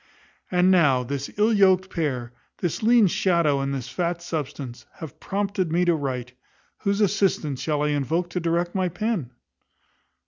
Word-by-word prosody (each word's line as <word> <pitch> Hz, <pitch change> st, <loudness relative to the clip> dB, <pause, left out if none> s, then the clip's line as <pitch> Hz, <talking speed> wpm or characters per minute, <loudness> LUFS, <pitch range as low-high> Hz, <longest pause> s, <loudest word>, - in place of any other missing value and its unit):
And 180 Hz, +1 st, +3 dB
now, 140 Hz, -9 st, +4 dB
this 140 Hz, +2 st, -4 dB
ill 215 Hz, +2 st, +3 dB
yoked 190 Hz, -2 st, +3 dB
pair, 130 Hz, -7 st, -2 dB, 0.2 s
this 175 Hz, -4 st, -2 dB
lean 230 Hz, 0 st, +5 dB
shadow 170 Hz, -6 st, +2 dB
and 135 Hz, 0 st, -2 dB
this 135 Hz, -3 st, -4 dB
fat 175 Hz, -1 st, -2 dB
substance, 140 Hz, -6 st, -5 dB
have 160 Hz, -5 st, -10 dB
prompted 195 Hz, -3 st, -2 dB
me 175 Hz, +2 st, +2 dB
to 175 Hz, -, +4 dB
write, 130 Hz, -5 st, -3 dB, 0.5 s
whose 200 Hz, 0 st, 0 dB
assistance 185 Hz, -9 st, +1 dB
shall 150 Hz, -2 st, 0 dB
I 150 Hz, -, +1 dB
invoke 160 Hz, +5 st, -1 dB
to 180 Hz, -, -1 dB
direct 170 Hz, +1 st, -1 dB
my 185 Hz, -2 st, 0 dB
pen? 180 Hz, -, -2 dB
170 Hz, 160 wpm, -24 LUFS, 140-190 Hz, 0.5 s, lean